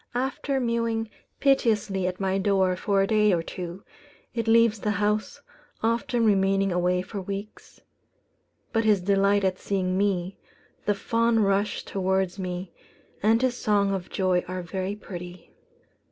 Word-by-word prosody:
After 265 +2 -1
mewing 230 -2 -1 0.3
piteously 215 -8 +2
at 180 0 -4
my 195 0 0
door 190 -2 +2
for 195 +1 +1
a - - +2
day 210 -1 +3
or 170 -1 0
two, 180 +2 -7 0.5
it 230 -2 -2
leaves 225 -1 +4
the 210 - -2
house, 210 +1 -1 0.4
often 230 +1 +1
remaining 195 -1 +3
away 180 +1 +1
for 200 +1 -6
weeks; 200 +2 -8 0.9
but 225 -1 +2
his 210 -2 +4
delight 200 +2 +2
at 185 -1 0
seeing 185 -1 -1
me, 195 -2 -1 0.5
the 205 - +3
fond 230 +1 +2
rush 200 +1 0
towards 190 -1 -1
me, 180 -1 -5 0.5
and 225 +4 +3
his 255 -1 +1
song 205 -4 +1
of 185 -2 -4
joy 185 -2 +1
are 185 0 -4
very 190 +3 -3
pretty." 180 -3 -9
200 Hz, 145 wpm, -26 LUFS, 185-220 Hz, 0.9 s, leaves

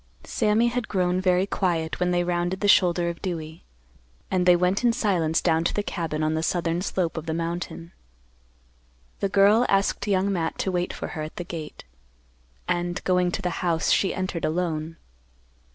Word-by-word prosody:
Sammy 225 +1 +2
had 245 0 -3
grown 185 -1 0
very 185 0 +3
quiet 170 -5 -1
when 180 0 +1
they 175 0 +1
rounded 175 +1 -1
the 205 - +2
shoulder 175 -3 +4
of 170 -1 -4
Dewey, 160 -3 -5 0.7
and 180 -1 +1
they 180 - +8
went 180 +5 +1
in 240 - +5
silence 175 -8 +1
down 165 -1 +2
to - - 0
the 205 - 0
cabin 160 -5 -3
on 155 0 +1
the 160 - -1
southern 170 +1 0
slope 180 -3 -2
of 160 0 -5
the 160 - -1
mountain. 170 0 -4 1.3
The 200 - 0
girl 205 +4 +5
asked 195 +1 +1
Young 195 0 +1
Matt 165 -3 -2
to 190 - -1
wait 180 -1 -1
for - - -6
her 160 - -5
at 155 +1 -6
the 175 - -4
gate, 165 -4 -8 0.8
and, 175 0 -1
going 180 -1 +2
to 200 - -3
the 180 - 0
house, 170 -3 +1
she 195 - +3
entered 185 -3 -3
alone. 165 -1 -2
175 Hz, 185 wpm, -25 LUFS, 165-190 Hz, 1.3 s, they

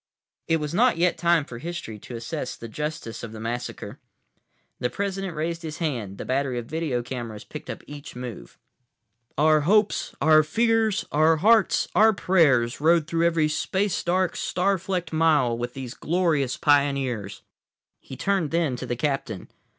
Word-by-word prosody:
It 165 - +3
was 150 -1 -4
not 240 +1 +3
yet 175 +1 +2
time 170 -3 +2
for 120 -3 -9
history 160 -9 -6
to 120 - -9
assess 125 +4 -4
the 115 - -9
justice 150 -1 -5
of 115 -1 -7
the 110 - -8
massacre. 120 +2 -5 0.8
The 125 - 0
President 195 -1 -3
raised 165 +2 -2
his 155 -2 -6
hand. 120 - -3
The - - -6
battery 130 -1 -1
of 120 - -4
video 145 -4 -2
cameras 120 -4 -6
picked - - -10
up - - -6
each 145 -2 -10
move. 125 -5 -8 0.8
"Our 155 +1 +4
hopes, 210 +7 +2
our 155 0 +6
fears, 220 +5 +1
our 155 +2 +4
hearts, 215 +3 +4
our 220 +1 +5
prayers 145 - +2
rode 165 0 +4
through 165 +1 +1
every 165 -2 +2
space 190 +5 -1
dark, 180 0 +1
star 190 +2 0
flecked 180 -2 -3
mile 155 -7 +3
with 120 +1 -5
these 130 -3 -6
glorious 155 -6 0
pioneers." 135 -8 +1 0.6
He 130 - -10
turned 190 0 0
then 165 -5 0
to 125 - -6
the 120 - -1
captain. 135 -6 -3
155 Hz, 165 wpm, -25 LUFS, 125-170 Hz, 0.8 s, our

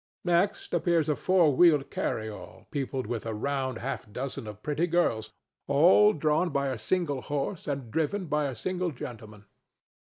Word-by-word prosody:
Next 175 +3 +1
appears 170 -4 +2
a 150 - +2
four 175 -6 +3
wheeled 150 -3 +4
carryall 110 -1 -4
peopled 135 -2 -2
with 115 -3 -3
a 110 - -3
round 130 +1 -2
half 125 -3 -5
dozen 125 -1 -5
of 105 0 -9
pretty 150 +3 0
girls, 115 -11 +1 0.4
all 175 +9 +6
drawn 155 +3 +1
by 140 -2 0
a 130 -4 -4
single 145 +1 -1
horse 145 +7 -3
and 135 -5 -4
driven 170 - -1
by 150 -2 0
a 135 -3 -3
single 180 +7 -2
gentleman. 110 -7 -9
145 Hz, 160 wpm, -28 LUFS, 125-170 Hz, 0.4 s, all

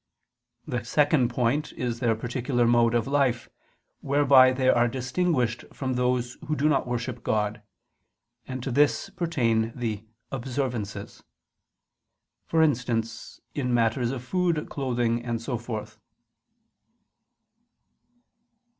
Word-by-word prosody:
The 120 -1 -3
second 145 0 +2
point 125 +5 0
is 120 -2 -3
their 115 -2 +2
particular 120 +2 -1
mode 120 0 +4
of 115 -2 +1
life, 135 -4 +1 0.5
whereby 135 -2 +5
they 130 0 0
are 120 -1 +4
distinguished 130 -1 -1
from 130 -2 -3
those 125 0 -1
who 155 - 0
do 150 +1 +2
not 140 -4 +1
worship 120 0 -3
God: 105 0 -1 0.9
and 130 -1 -5
to 135 - -3
this 145 +3 +2
pertain 115 -10 0
the 110 -4 -3 0.3
observances, 120 -6 -4 1.3
for 160 -1 +3
instance, 115 -5 -1
in 125 -4 0
matters 115 +1 +1
of 125 -1 -4
food, 175 0 -1
clothing, 120 -3 -1
and 120 -1 -2
so 120 0 -3
forth. 110 -2 -6
125 Hz, 115 wpm, -26 LUFS, 115-135 Hz, 1.3 s, whereby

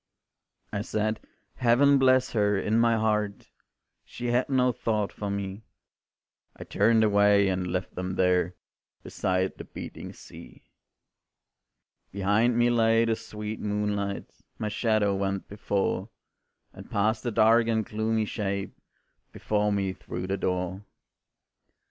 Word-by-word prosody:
I 100 - -1
said, 110 0 -1 0.4
Heaven 135 +3 +4
bless 130 -1 +4
her, 105 -2 +2
in 110 +3 +1
my 115 0 +4
heart, 105 -2 -1 0.5
She 120 0 -5
had 125 +3 +1
no 125 -2 +3
thought 110 -4 -2
for 105 - -5
me; 100 0 -4 0.9
I - - -9
turned 110 +2 +3
away 100 -1 +4
and 90 -1 -1
left 90 +1 -3
them 90 0 -4
there 90 -1 +2 0.5
Beside 95 0 -1
the - - -6
beating - - -8
sea. - - -14 1.5
Behind 105 +5 +2
me 120 0 +3
lay 115 -1 +3
the 115 -1 +1
sweet 105 0 -7
moonlight, 105 -1 -2 0.3
My 105 - -2
shadow 105 -1 +1
went 95 0 -2
before, 100 0 -2 0.6
And - - -12
passed 110 +2 0
a - - 0
dark 115 +2 +4
and 110 -2 +1
gloomy 110 +1 -1
shape 100 -2 -3 0.6
Before 105 0 0
me 100 -2 -1
through 90 -1 -6
the 95 +1 -1
door. 90 +1 -2
105 Hz, 130 wpm, -27 LUFS, 100-115 Hz, 1.5 s, Heaven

